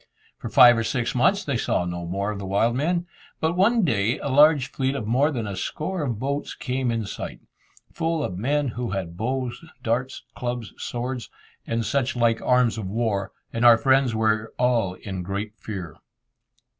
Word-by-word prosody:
For - - -5
five 120 -1 +7
or - - 0
six 120 +1 -1
months 195 +11 +3
they 140 -4 0
saw 90 - 0
no 85 -1 -4
more 100 +4 -2
of 105 - -5
the 100 - -5
wild 110 +5 +2
men. 170 +6 0 0.3
But 160 +2 0
one 220 +5 +3
day 115 -1 +1
a - - -4
large 145 -1 +5
fleet 135 0 -1
of 115 - -3
more 130 +7 +3
than 120 -7 -3
a 100 -2 -4
score 155 - -3
of 125 -7 -2
boats 140 +5 -3
came 130 0 -2
in 115 -2 -1
sight, - - -6 0.5
full 165 -2 -1
of 90 - -3
men 140 +7 0
who 120 0 -4
had 90 -3 -4
bows, 125 - -3 0.2
darts, 125 +3 -1
clubs, 120 -4 -4
swords, 125 -1 -4 0.4
and 115 0 -1
such 130 +4 0
like 115 -2 +2
arms 125 -3 +2
of 100 - -4
war, 105 -2 -1 0.2
and 115 - -1
our 120 -1 +8
friends 130 -1 +3
were 110 0 0
all 120 -7 +1
in 95 -1 -6
great 100 +3 -4
fear. 90 -7 -7
120 Hz, 185 wpm, -24 LUFS, 105-135 Hz, 0.5 s, our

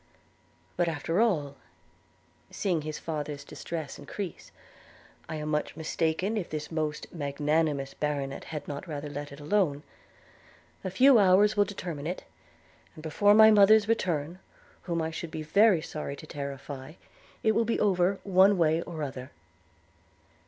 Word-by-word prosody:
But 175 -1 +2
after 165 +4 0
all 150 -11 0 0.9
(seeing 180 -5 -1
his 155 0 -5
father's 150 -3 -5
distress 155 0 -6
increase), 180 +5 -7 0.8
I 160 - -4
am 155 0 -4
much 150 0 -2
mistaken 165 +6 -1
if 190 - -3
this 150 0 -5
most 155 -2 -3
magnanimous 145 -1 -1
baronet 140 -2 -3
had 150 -2 -6
not 145 +5 -6
rather 145 -2 -5
let 145 0 -6
it 140 - -11
alone 150 -2 0 0.5
– - - -29
A 190 - -2
few 250 +6 +6
hours 205 +2 +5
will 205 -1 +4
determine 170 -7 -6
it; 180 - -4 0.7
and 155 - -11
before 205 +7 +4
my 220 0 +8
mother's 210 +1 +6
return, 175 -6 -1 0.4
whom 170 -2 -2
I 160 - -2
should 165 0 -6
be 155 0 -5
very 190 +1 +4
sorry 150 -3 -5
to 150 - -11
terrify, 140 -1 -7 0.5
it 220 - +4
will 230 +2 +2
be 230 +1 -1
over, 190 -1 +2
one 195 +1 +5
way 160 -1 +2
or 165 -3 -6
other.' 130 -2 -6
160 Hz, 150 wpm, -28 LUFS, 145-190 Hz, 0.9 s, my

